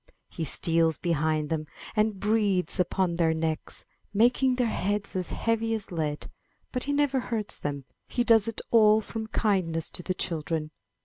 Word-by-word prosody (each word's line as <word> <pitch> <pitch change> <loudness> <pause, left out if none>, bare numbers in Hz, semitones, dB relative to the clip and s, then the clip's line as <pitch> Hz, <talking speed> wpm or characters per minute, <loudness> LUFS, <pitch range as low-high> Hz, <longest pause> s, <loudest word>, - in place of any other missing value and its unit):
He 165 - -3
steals 165 +1 +1
behind 155 -2 0
them 155 -1 -1 0.3
and 215 -2 +1
breathes 205 -4 +1
upon 180 0 +1
their 165 -1 +2
necks, 160 -1 -2 0.3
making 250 +4 +4
their 250 -1 +1
heads 205 -2 -1
as 185 -2 -1
heavy 225 0 0
as 210 -3 -6
lead; 155 -3 -2 0.5
but 250 - -2
he 285 - -1
never 285 -2 +2
hurts 225 -4 -3
them; 140 -2 -4 0.2
he 245 - 0
does 225 -3 +5
it 230 - -3
all 215 -1 +6
from 220 0 -5
kindness 180 -8 0
to - - -1
the 185 +1 -2
children. 160 -3 -2
190 Hz, 165 wpm, -27 LUFS, 160-225 Hz, 0.5 s, all